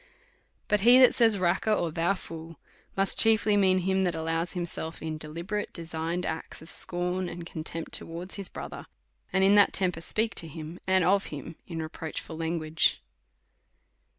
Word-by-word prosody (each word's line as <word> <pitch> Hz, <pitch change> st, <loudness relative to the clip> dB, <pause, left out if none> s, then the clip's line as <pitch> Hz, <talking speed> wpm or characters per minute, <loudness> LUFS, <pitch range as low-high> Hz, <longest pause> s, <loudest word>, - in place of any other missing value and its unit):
Cut 210 Hz, -, +2 dB
he 240 Hz, +5 st, +7 dB
that 255 Hz, -, +7 dB
says, 225 Hz, -3 st, +4 dB
Raca, 180 Hz, +4 st, +1 dB
or 170 Hz, -4 st, -1 dB
Thou 170 Hz, +5 st, +1 dB
fool, 165 Hz, -3 st, -9 dB, 0.4 s
must 195 Hz, 0 st, +3 dB
chiefly 220 Hz, -1 st, +6 dB
mean 190 Hz, -2 st, +4 dB
him 190 Hz, +1 st, +1 dB
that 175 Hz, -2 st, 0 dB
allows 165 Hz, +2 st, -2 dB
himself 170 Hz, -2 st, -4 dB
in 155 Hz, -1 st, -5 dB
deliberate, 170 Hz, +7 st, -4 dB
de 170 Hz, -, -7 dB
signed 165 Hz, +2 st, -3 dB
acts 160 Hz, -, -5 dB
of 160 Hz, -, -9 dB
scorn 180 Hz, +1 st, -1 dB
and 175 Hz, -1 st, -8 dB
contempt 165 Hz, 0 st, -5 dB
towards 170 Hz, +3 st, -4 dB
his 200 Hz, -2 st, -3 dB
brother,, -, -, -8 dB, 0.4 s
and 190 Hz, -, +2 dB
in 195 Hz, +1 st, +6 dB
that 205 Hz, -1 st, +6 dB
temper 180 Hz, -4 st, +1 dB
speaks 215 Hz, +4 st, 0 dB
to 165 Hz, -, -9 dB
him, 160 Hz, +2 st, -8 dB
and 190 Hz, -1 st, +3 dB
of 195 Hz, +2 st, +3 dB
him, 150 Hz, +2 st, -8 dB
in 165 Hz, -2 st, -4 dB
re -, -, -4 dB
proachful 160 Hz, 0 st, -6 dB
language. 160 Hz, -1 st, +1 dB
175 Hz, 175 wpm, -28 LUFS, 165-195 Hz, 0.4 s, he